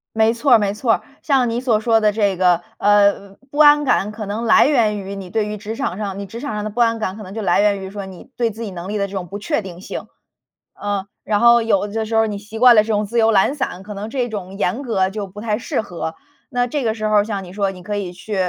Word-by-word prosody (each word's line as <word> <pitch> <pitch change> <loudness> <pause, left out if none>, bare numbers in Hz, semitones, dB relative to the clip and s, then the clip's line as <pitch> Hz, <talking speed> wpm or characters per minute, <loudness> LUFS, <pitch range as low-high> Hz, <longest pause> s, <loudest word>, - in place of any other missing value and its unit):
没 220 0 +4
错 260 +3 +1
儿 235 - +9
没 205 -1 -1
错 225 +1 +2
儿， - - -4 0.2
像 265 -4 +2
你 230 +1 -1
所 240 -4 +2
说 225 +1 +2
的 215 -1 +3
这 205 -2 0
个， 180 -1 +3 0.2
呃， 200 -1 +3
不 290 - -7
安 295 -1 +7
感 210 -6 +1
可 215 0 -7
能 210 +4 -3
来 220 - +6
源 230 -8 +2
于 195 0 -6
你 195 -2 -8
对 215 0 0
于 210 0 -4
职 215 +2 -6
场 240 -8 -3
上 200 -2 -4
你 200 - -5
职 225 +5 -8
场 285 -4 -4
上 210 0 -3
的 215 - -3
不 230 +4 -4
安 230 -1 +3
感， 195 -3 -3
可 215 - -8
能 190 -2 -10
就 220 +1 -4
来 180 -1 +3
源 205 -1 +2
于 190 0 -7
说 200 -1 -6
你 190 -2 -12
对 235 -2 +1
自 220 +2 -8
己 205 - -6
能 175 +1 -7
力 210 +1 -2
的 200 - 0
这 200 - -13
种 185 -3 -4
不 200 - -6
确 230 +3 -1
定 180 -3 -9
性。 - - -7 0.7
嗯， 205 -1 -2 0.2
然 210 -1 0
后 235 +1 +6
有 205 -3 +1
的 220 +2 -3
时 225 +1 -3
候 225 0 +4
你 205 -1 -4
习 210 +2 -9
惯 245 0 +8
了 215 - +6
这 - - -11
种 210 -1 0
自 230 +4 -4
由 225 -1 +4
懒 210 +7 +3
散， 225 -10 -3
可 210 +2 -8
能 205 +2 -6
这 250 0 -1
种 195 -4 -6
严 200 +5 -1
格 200 -8 0
就 205 +1 -5
不 195 +2 -11
太 210 -1 -1
适 235 - -3
合， 170 -5 -6 0.3
那 245 -2 0
这 280 +2 -2
个 220 -2 +1
时 215 -1 -3
候 210 -1 +4
像 205 -2 -4
你 180 - -11
说， 200 -1 0
你 185 -1 -11
可 205 +3 -4
以 195 -3 -3
去， 180 +4 -7
210 Hz, 310 characters per minute, -20 LUFS, 195-225 Hz, 0.7 s, 儿